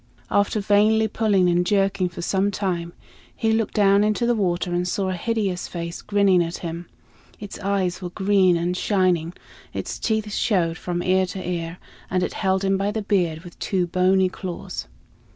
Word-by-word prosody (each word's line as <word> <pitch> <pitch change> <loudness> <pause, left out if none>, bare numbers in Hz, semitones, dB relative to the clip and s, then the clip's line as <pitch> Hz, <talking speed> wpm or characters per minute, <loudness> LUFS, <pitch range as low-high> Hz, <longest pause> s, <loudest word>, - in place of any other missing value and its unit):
After 205 +1 +2
vainly 215 +2 +3
pulling 205 -4 +2
and 175 0 +3
jerking 195 -1 +1
for 170 0 -7
some 195 +2 +1
time, 180 -4 -2 0.4
he 225 - 0
looked 220 -1 0
down 200 -1 +4
into 215 +3 +1
the 240 - +3
water 180 -4 -1
and 175 +1 0
saw 190 +1 -1
a - - -1
hideous 195 -1 -2
face 170 -1 -6
grinning 200 -3 +3
at 170 +1 -4
him. 170 +1 -5 0.5
Its 205 -1 -8
eyes 190 -2 -1
were 180 - -4
green 190 -1 +3
and 175 +2 -1
shining, 180 -4 +1 0.4
its - - -4
teeth 220 -2 -1
showed 175 -7 +1
from 175 -1 -3
ear 185 0 +2
to 185 -1 -6
ear, 170 -1 -3 0.3
and 185 0 0
it - - -2
held 190 -1 0
him 195 0 +2
by 195 +1 0
the 215 0 -3
beard 175 -6 0
with 175 -2 -13
two 185 -3 0
bony 185 +2 +3
claws. 185 -1 -6
190 Hz, 180 wpm, -23 LUFS, 175-205 Hz, 0.5 s, down